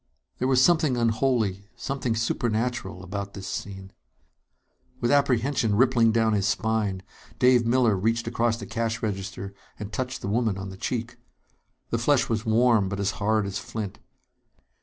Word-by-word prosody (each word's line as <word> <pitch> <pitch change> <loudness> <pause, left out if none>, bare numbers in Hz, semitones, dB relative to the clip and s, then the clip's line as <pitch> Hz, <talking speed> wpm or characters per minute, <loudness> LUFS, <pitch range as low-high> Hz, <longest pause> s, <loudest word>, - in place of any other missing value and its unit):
There 130 - +1
was 130 -1 +4
something 160 -7 +3
unholy, 110 -4 0
something 130 -4 -2
supernatural, 115 -4 -1
about 100 +1 -5
this 95 -2 -7
scene! 95 -1 -6 1.1
With 120 - +1
apprehension 130 -5 +2
rippling 120 -1 +4
down 110 -1 +2
his 100 -1 +1
spine, 100 -2 0 0.3
Dave 125 -2 +4
Miller 120 -3 +3
reached 115 +5 0
across 115 0 0
the 105 - -7
cash 115 +1 -2
register 100 -1 -4 0.2
and 105 0 -7
touched 130 -1 -3
the - - -4
woman 110 -1 0
on 95 0 -6
the 95 - -8
cheek. 120 +4 -4 0.7
The 115 - +1
flesh 125 0 +2
was 110 0 -1
warm, 110 -3 +3
but 100 +1 -4
as 100 0 +1
hard 110 0 +2
as 100 0 -3
flint. 105 -3 -6
110 Hz, 155 wpm, -26 LUFS, 100-120 Hz, 1.1 s, was